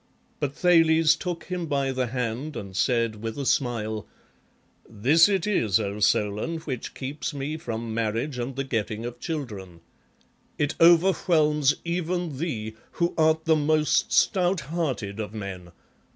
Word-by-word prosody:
But 145 -1 -2
Thales 165 -2 +4
took 175 0 -5
him 180 -2 -4
by 140 -2 0
the 130 -1 -1
hand 125 +4 -3
and 95 -2 -8
said, 115 -1 +1
with 115 +2 -4
a 140 - -3
smile, 110 -5 -1 0.4
" - - -33
This 135 - +4
it 195 -4 +1
is, 115 - +2
O 100 -1 -3
Solon, 105 +9 +1
which 135 -7 -5
keeps 145 +3 -5
me 140 +2 -3
from 115 -7 -5
marriage 115 +4 -2
and 120 +2 -4
the 135 - -2
getting 115 -3 -3
of 120 0 -7
children; 105 - -6 0.8
it 145 -1 0
overwhelms 165 -4 +4
even 170 -3 -2
thee, 110 -10 -3 0.2
who 170 0 0
art 160 0 +2
the 160 -1 +4
most 155 0 +2
stout 185 -2 +2
hearted 135 -10 -3
of 105 0 -5
men. 95 -4 -7
135 Hz, 150 wpm, -25 LUFS, 110-160 Hz, 0.8 s, Thales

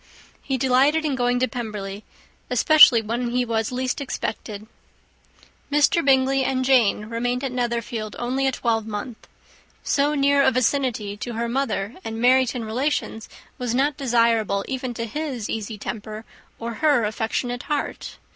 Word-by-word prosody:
He 270 -1 -2
delighted 270 +5 +3
in 295 - 0
going 245 -1 +1
to 255 - +3
Pemberley, 210 -5 -6 0.5
especially 250 -1 +6
when 235 +3 -2
he 245 +1 0
was 225 -1 -1
least 255 +2 -2
expected. 215 -5 -5 1.1
Mr. 295 +3 +3
Bingley 270 0 +3
and 260 0 0
Jane 235 -5 +3
remained 245 +3 -2
at 270 - -2
Netherfield 235 -3 -3
only 260 +3 -1
a - - +2
twelvemonth. 225 -1 -3 0.6
So 290 +1 +1
near 280 0 +3
a - - +5
vicinity 250 -5 0
to 240 +3 -5
her 230 +1 -2
mother 235 -4 -2
and 225 0 -5
Meryton 250 -1 +3
relations 225 -1 -2 0.3
was 245 -1 -2
not 280 +2 +1
desirable 230 -6 +1
even 255 -2 -4
to 230 - -3
his 255 -2 -4
easy 220 0 -4
temper, 215 +1 -6 0.3
or 230 0 -5
her 290 -6 +4
affectionate 225 +3 -2
heart. 295 -2 -3
245 Hz, 145 wpm, -23 LUFS, 225-265 Hz, 1.1 s, especially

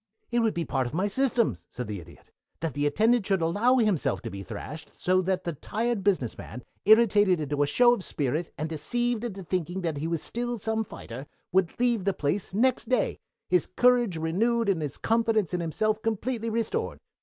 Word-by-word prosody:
"It 240 - +2
would 225 -3 +1
be 170 -1 -1
part 130 -3 -1
of 120 - -6
my 185 +4 +1
system," 235 - +1
said 125 - -5
the 105 -2 -5
Idiot, 85 - -15 0.3
"that 160 -4 -2
the 145 +2 +1
attendant 220 +7 +2
should 190 -4 +1
allow 205 +10 +3
himself 215 - +1
to 115 - -5
be 100 - -6
thrashed, 150 - -8
so 185 +1 +3
that 185 0 -1
the 170 - -2
tired 225 - -2
business 180 - 0
man, 125 +3 -8 0.2
irritated 205 -4 +5
into 145 -1 -1
a 145 - +3
show 240 +8 +5
of 205 - -3
spirit 150 +3 -1
and 155 - -2
deceived 240 +9 -1
into 200 -5 -5
thinking 180 +1 -2
that 165 -4 -2
he 155 +3 -2
was 165 -1 -2
still 240 0 -3
some 220 +1 -1
fighter, 135 - -9 0.2
would 185 0 +1
leave 240 -5 +1
the 195 -2 +1
place 170 +5 -1
next 250 +8 +1
day, 250 -4 +1 0.3
his 180 -2 +2
courage 240 -3 +3
renewed 215 +8 +1
and 180 -5 +1
his 145 -2 -4
confidence 225 -5 +1
in 180 - 0
himself 215 +7 0
completely 225 +1 -2
restored. 230 - -2
190 Hz, 200 wpm, -27 LUFS, 160-230 Hz, 0.3 s, irritated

